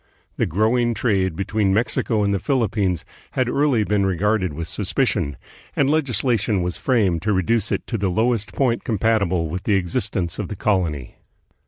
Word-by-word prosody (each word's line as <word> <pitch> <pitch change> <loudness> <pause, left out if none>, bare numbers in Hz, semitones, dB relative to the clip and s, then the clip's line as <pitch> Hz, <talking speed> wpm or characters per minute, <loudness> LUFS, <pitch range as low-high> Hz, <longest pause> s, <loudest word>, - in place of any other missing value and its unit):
The - - +1
growing 115 +6 +1
trade 95 -8 0
between 100 +1 0
Mexico 110 -1 0
and 100 0 +1
the 100 - 0
Philippines 105 - 0 0.3
had 130 -2 +1
early 135 -3 +2
been 105 -1 +1
re 95 -1 +1
garded 105 -2 +1
with 80 +3 -5
suspicion, 95 - -1 0.4
and 140 0 +2
legislation 120 - +1
was 90 -1 -2
framed 100 - +1
to 105 +3 0
reduce 105 +3 +1
it - - -1
to 115 - -3
the 100 -1 0
lowest 110 +2 0
point 125 -4 0
compatible 100 -6 +1
with 90 +4 -4
the 105 - +3
existence 95 0 -1
of 105 - -2
the 105 - -6
colony. 85 - -1
105 Hz, 170 wpm, -22 LUFS, 95-115 Hz, 0.4 s, the